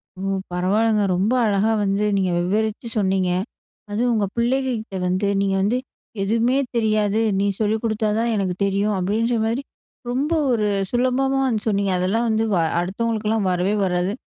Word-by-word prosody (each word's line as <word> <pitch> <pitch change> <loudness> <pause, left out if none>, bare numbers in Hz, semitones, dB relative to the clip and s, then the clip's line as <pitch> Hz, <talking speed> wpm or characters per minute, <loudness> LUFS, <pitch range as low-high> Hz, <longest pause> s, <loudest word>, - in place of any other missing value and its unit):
ஓ! - - -14 0.3
பரவாயில்லங்க 210 +4 +1
ரொம்ப 200 +7 +1
அழகா 210 +1 +2
வந்து 200 +1 0
நீங்க 190 -2 +1
விவரிச்சு 215 +5 -1
சொன்னிங்க. 190 -2 +1 0.6
அதுவும் 235 +4 0
உங்க 210 -2 +1
பிள்ளைங்க 260 +3 +1
கிட்ட 205 -3 -8
வந்து 185 +3 0
நீங்க 195 -1 +1
வந்து 215 +5 +1 0.5
எதுவுமே 230 +5 +1 0.2
தெரியாது. 215 -1 +1 0.2
நீ 200 - +1
சொல்லிக் 215 +1 0
கொடுத்தா 220 -1 0
தான் 230 +1 0
எனக்கு 190 -3 -1
தெரியும். 200 +2 +1
அப்படின்ற 225 +6 0
மாதிரி 235 +5 -1 0.5
ரொம்ப 280 +6 -1 0.2
ஒரு 215 -3 +1 0.2
சுலபமா 255 +2 +1
வந்து 220 -5 -1
சொன்னீங்க. 200 -2 +1
அதெல்லாம் 210 +6 0
வந்து 220 0 +1 0.4
அடுத்தவங்களுக்கலாம் 215 +2 -1
வரவே 180 +3 +1
வராது. 180 +1 0
215 Hz, 145 wpm, -22 LUFS, 195-230 Hz, 0.6 s, அழகா